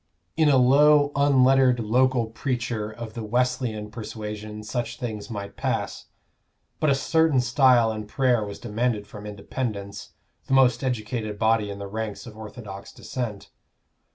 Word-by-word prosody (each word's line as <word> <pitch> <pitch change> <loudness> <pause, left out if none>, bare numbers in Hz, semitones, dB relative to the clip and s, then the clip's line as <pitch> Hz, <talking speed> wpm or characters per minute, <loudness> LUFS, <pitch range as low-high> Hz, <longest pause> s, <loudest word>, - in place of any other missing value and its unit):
In 155 -2 +4
a 135 - +5
low 145 +3 +5
unlettered 135 -2 +4
local 125 +2 +2
preacher 115 -2 -3
of 110 0 -8
the 115 - -5
Wesleyan 120 -2 -1
persuasion 105 -1 -7
such 120 +1 -3
things 110 -3 -5
might 100 -3 -6
pass; - - -2 0.7
but 155 - +2
a 140 - +4
certain 160 0 +2
style 125 -2 +4
in 110 -1 -6
prayer 125 0 +2
was 100 -1 -6
demanded 115 -2 -1
from 105 0 -10
Independents, 100 -1 -5 0.3
the 135 - +2
most 130 0 +4
educated 110 -3 -3
body 110 -1 +2
in 100 - -6
the 100 - -6
ranks 110 +3 -5
of 115 -3 -10
orthodox 105 -2 -9
Dissent. 115 -6 -6
115 Hz, 145 wpm, -25 LUFS, 105-130 Hz, 0.7 s, a